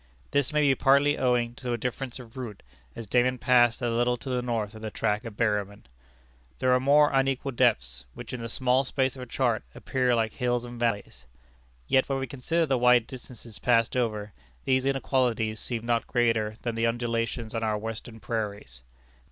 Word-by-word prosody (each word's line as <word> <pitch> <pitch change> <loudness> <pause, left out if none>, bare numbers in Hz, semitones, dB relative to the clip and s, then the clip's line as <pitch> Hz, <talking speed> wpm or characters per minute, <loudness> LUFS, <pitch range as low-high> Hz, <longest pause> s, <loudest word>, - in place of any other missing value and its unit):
(This 140 -2 +1
may 150 0 +2
be 140 -2 +4
partly 140 +2 +4
owing 120 -2 +1
to 125 -2 -3
a - - 0
difference 125 +2 -4
of 120 -3 -12
route, 120 -6 -7 0.3
as 115 - -7
Dayman 125 +4 +2
passed 120 -1 +3
a 120 - +1
little 120 +1 +1
to 130 - -8
the 125 -1 0
north 115 -4 -2
of 110 - -11
the 110 - -4
track 105 +1 -1
of 110 -3 -8
Berryman.) 105 -3 -1 0.7
There 130 0 +2
are 125 - +4
more 145 +3 +5
unequal 135 0 +1
depths, 65 - +1
which - - -8
in 125 - -4
the 115 - -5
small 130 +2 +2
space 130 -1 -1
of 130 - -9
a 125 - -7
chart, 120 -2 0
appear 125 -2 0
like 110 -2 0
hills 125 -1 -1
and 120 0 -9
valleys. 100 - -2 0.6
Yet 130 +1 +3
when 135 - 0
we 135 - -2
consider 145 +6 -1
the 135 -4 +1
wide 125 -1 +5
distances 120 -4 -11
passed 115 -1 +2
over, 105 -5 -1 0.3
these 130 0 +2
inequalities 125 -5 0
seem 115 -1 -4
not 120 -1 0
greater 115 -3 +1
than 120 - -2
the 115 +1 +1
undulations 115 -1 -2
on 115 - -2
our 110 -1 0
Western 115 +1 -6
prairies. 105 - -5
120 Hz, 195 wpm, -27 LUFS, 115-130 Hz, 0.7 s, more